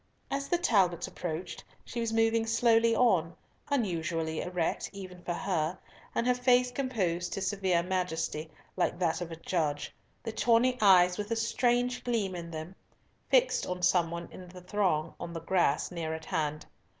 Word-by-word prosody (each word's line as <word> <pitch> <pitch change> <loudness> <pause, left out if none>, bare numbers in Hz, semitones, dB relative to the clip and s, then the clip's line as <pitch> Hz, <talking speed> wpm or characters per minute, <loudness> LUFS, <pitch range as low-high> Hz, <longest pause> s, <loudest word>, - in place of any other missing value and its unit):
As 275 0 -2
the 350 - +2
Talbots 195 - +2
approached, 175 0 -5 0.2
she 240 - -5
was 230 -1 -1
moving 225 0 +2
slowly 230 0 +4
on, 180 -10 +2 0.3
unusually 165 - -1
erect 180 -2 -2
even 185 -2 -9
for 175 -1 -3
her, 175 -2 -1 0.4
and 235 - +1
her 250 - +4
face 250 0 +3
composed 195 -10 -1
to 195 - -3
severe 190 -3 +1
majesty, 165 -4 -2 0.3
like - - 0
that 175 -1 0
of 170 -1 -5
a - - -5
judge, 160 -3 -2 0.3
the 225 - -3
tawny 240 +3 +3
eyes 180 -2 +6
with 205 0 -3
a 230 - 0
strange 245 +2 +1
gleam 220 -6 -1
in 170 -1 -6
them 160 +2 -7 0.6
fixed - - +3
on 180 0 -4
some 175 -2 +3
one 170 0 -5
in 180 -1 -11
the 180 0 -11
throng 180 -5 0
on 170 -1 -6
the 165 - -4
grass 170 -4 +1
near 160 -2 -3
at 160 0 -9
hand. 150 -1 -2
185 Hz, 170 wpm, -30 LUFS, 170-230 Hz, 0.6 s, eyes